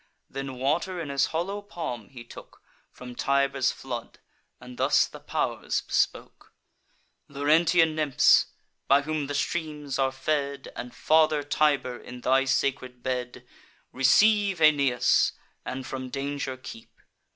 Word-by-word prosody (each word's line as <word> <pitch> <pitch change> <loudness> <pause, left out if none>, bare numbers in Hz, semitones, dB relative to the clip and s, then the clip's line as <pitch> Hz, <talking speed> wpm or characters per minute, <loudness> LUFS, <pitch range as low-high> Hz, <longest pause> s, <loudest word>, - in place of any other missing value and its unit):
Then 135 -1 -6
water 165 +8 -1
in 160 -4 -5
his 140 -1 +1
hollow 190 +5 -3
palm 165 - -6
he 125 -3 -11
took 120 - -14 0.3
From 125 0 -11
Tiber's 140 0 +1
flood, 120 -3 -7 0.4
and 125 0 -12
thus - - +4
the - - -11
pow'rs - - -2
bespoke: - - -2 0.7
"Laurentian 160 +3 +3
nymphs, 155 -4 +4 0.4
by 140 +1 +4
whom 155 -1 -2
the 145 - -4
streams 150 -3 -3
are 135 0 +2
fed, 140 0 -2
And 125 0 -7
Father 155 -1 +3
Tiber, 145 -4 +1
in 125 0 -10
thy 135 +2 +3
sacred 130 -2 -1
bed 125 -1 -4 0.4
Receive 200 +8 +3
Aeneas, 140 -6 +3 0.3
and 130 0 -5
from 130 0 -6
danger 140 0 -4
keep. 120 -3 -12
140 Hz, 130 wpm, -26 LUFS, 130-155 Hz, 0.7 s, thus